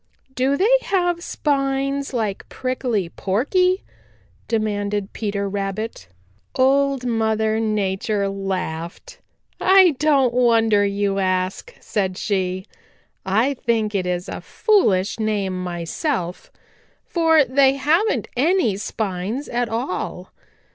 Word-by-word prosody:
"Do 265 +2 +1
they 465 +9 +5
have 350 -3 0
spines 275 -2 -1
like 220 -6 -3
Prickly 250 -7 -2
Porky?" 365 - +1 0.6
demanded 205 -2 -1
Peter 200 -2 -2
Rabbit. 195 - -4 0.5
Old 275 0 +2
Mother 220 -2 +1
Nature 205 -1 0
laughed. 190 - -5 0.4
"I 375 -1 +6
don't 275 -5 +3
wonder 225 -4 +3
you 200 0 0
ask," 185 - -1
said 190 -3 -2
she. 185 -2 -1 0.6
"I 225 +9 +2
think 225 -4 -1
it 185 -2 -1
is 180 0 -2
a - - -6
foolish 215 - +1
name 200 -4 -1
myself, 175 - -3 0.5
for 325 -3 +3
they 265 +1 +4
haven't 320 +11 +1
any 270 - +2
spines 210 +4 -3
at 240 -1 -1
all. 190 -5 -4
220 Hz, 105 wpm, -21 LUFS, 195-275 Hz, 0.6 s, I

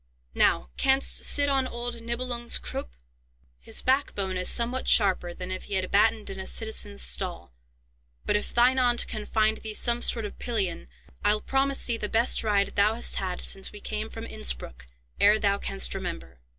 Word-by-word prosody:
Now 65 -2 +2
canst 270 0 +2
sit 285 0 +2
on 270 -2 +1
old 240 -1 -5
Nibelung's 235 0 -2
croup? - - -7 0.6
His - - -2
back 265 +2 +1
bone 190 -2 -3
is 180 0 +1
somewhat 245 +2 +1
sharper 190 -4 +4
than 180 +1 -7
if 185 - -5
he 200 - -3
had 185 -1 -1
battened 215 +1 +2
in 190 - -7
a 190 - -6
citizen's 215 - 0
stall; 60 -1 0 0.7
but, - - +1
if 210 - -1
thine 250 +2 +3
aunt 245 -1 +3
can 215 -2 -6
find 220 0 +1
thee 215 -1 -6
some 240 +2 0
sort 230 -3 +2
of 205 - -9
pillion, 200 - -2 0.4
I'll 210 +1 +3
promise 270 +3 -1
thee 235 -2 0
the 210 - -4
best 230 +1 +2
ride 205 -2 +2
thou 210 +2 +2
hast 235 - +2
had 185 -2 -3
since 195 - -1
we 210 - -10
came 215 +1 -4
from 225 0 -8
Innspruck, 60 - -3 0.3
ere 210 +1 +5
thou 200 -2 0
canst 65 -1 -2
remember." 65 0 -7
215 Hz, 185 wpm, -26 LUFS, 190-240 Hz, 0.7 s, ere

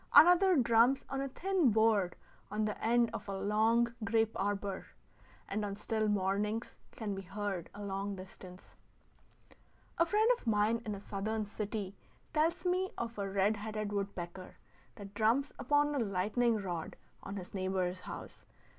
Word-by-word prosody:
Another 360 +2 +8
drums 240 0 +4
on 270 0 -2
a 275 - -1
thin 365 0 +2
board 215 -4 +3 0.3
on 210 +1 0
the 210 - -1
end 235 0 +3
of 225 - -6
a 195 - -2
long 225 +4 +2
grape 225 0 +2
arbor, 200 -1 -2 0.6
and 210 +2 -2
on 200 -1 -3
still 215 +1 -1
mornings 205 +3 0
can 215 -3 -4
be 195 - -4
heard 195 -2 -4
a 205 - -7
long 200 0 -3
distance. 185 -1 -12 1.2
A 335 - +6
friend 425 +4 +3
of - - -15
mine 220 +1 +2
in 210 - -2
a - - -7
Southern 210 +2 -3
city 205 -1 -4 0.4
tells 330 +4 +1
me 365 +1 +1
of 235 -2 -4
a 200 -1 -2
red 200 +2 +2
headed 215 0 -4
woodpecker 190 -2 -4 0.4
that 200 -1 -10
drums 230 +7 +2
upon 290 +2 +2
a 285 - 0
lightning 220 +3 +1
rod 175 -5 -4 0.3
on 195 - -6
his 185 -2 -7
neighbor's 185 -1 -1
house. - - -9
210 Hz, 155 wpm, -33 LUFS, 195-235 Hz, 1.2 s, Another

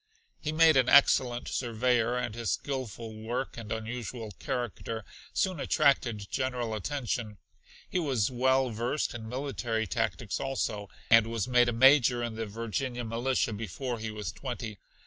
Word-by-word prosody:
He 155 - -2
made 160 -1 +6
an 125 -1 +4
excellent 125 -3 +5
surveyor, 120 0 +1
and 120 -3 -2
his 115 -2 -3
skilful 120 -5 -3
work 120 +5 -3
and 115 -2 -8
unusual 115 0 -4
character 115 -2 -4 0.3
soon 185 -4 0
attracted 120 -8 +2
general 125 -3 -1
attention. 115 -2 -3 0.5
He 185 - -1
was 130 - +1
well 130 +1 +2
versed 120 +7 -1
in 110 -2 -7
military 125 -4 -2
tactics 105 -2 -2
also, 105 -7 -2 0.2
and 115 -1 +7
was 115 -3 -2
made 125 -1 +4
a - - +1
Major 125 0 +5
in 120 -1 -3
the 110 0 -4
Virginia 115 +3 -3
militia 115 +1 0
before 115 +4 -4
he 110 0 -4
was 105 -1 -4
twenty. 120 -6 -6
120 Hz, 145 wpm, -29 LUFS, 110-130 Hz, 0.5 s, and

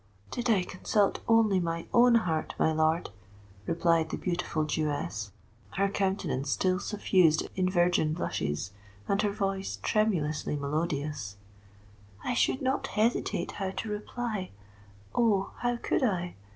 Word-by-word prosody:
"Did 245 -1 -2
I 200 -5 +4
consult 195 +2 0
only 225 -4 +4
my 165 -1 -2
own 240 0 +6
heart, 165 -8 0
my 160 - +3
lord," 160 +2 +1 0.6
replied 165 -1 +2
the - - -3
beautiful 170 -3 -1
Jewess, 145 - -2 0.5
her 200 0 +3
countenance 190 -9 -1
still 185 +5 +1
suffused 185 -7 +2
in 185 -1 +1
virgin 175 -4 +2
blushes, 75 - -2 0.4
and 200 0 +2
her 210 -2 +1
voice 195 -1 -2
tremulously 175 -10 +1
melodious, 145 - -2 0.9
"I 250 - -1
should 260 +2 +1
not 265 +1 0
hesitate 215 -5 0
how 195 -2 -3
to 215 +3 -5
reply—oh! 190 - -3
how 245 0 0
could - - 0
I? 180 -8 0
180 Hz, 125 wpm, -29 LUFS, 155-210 Hz, 0.9 s, own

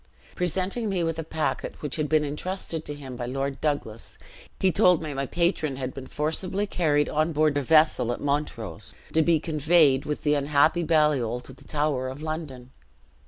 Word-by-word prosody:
Presenting 185 +6 -1
me 185 -3 0
with 165 -1 -2
a - - -2
packet 160 0 -3
which 150 - -3
had 150 -2 -1
been 155 -1 +3
intrusted 160 +2 -4
to 145 - -5
him 135 -3 -8
by 120 -1 -4
Lord 135 +2 -3
Douglas, 130 -7 -3 0.4
he 190 - +3
told 180 -1 +4
me 150 -2 -4
my 135 0 -2
patron 170 -4 0
had 130 -1 -4
been 130 -1 -8
forcibly 180 +6 -2
carried 150 -7 +1
on 155 +2 0
board 155 -1 +2
a 145 - +1
vessel 155 -4 +4
at - - -3
Montrose, 140 -8 -3 0.2
to 160 - +4
be 160 0 +3
conveyed 155 -3 +3
with 150 - -3
the 150 - +3
unhappy 145 +4 +3
Baliol 150 -7 +2
to 130 - -11
the 130 - -18
Tower 145 -4 -1
of 135 +4 -7
London. 150 -6 -5
150 Hz, 185 wpm, -26 LUFS, 135-160 Hz, 0.4 s, told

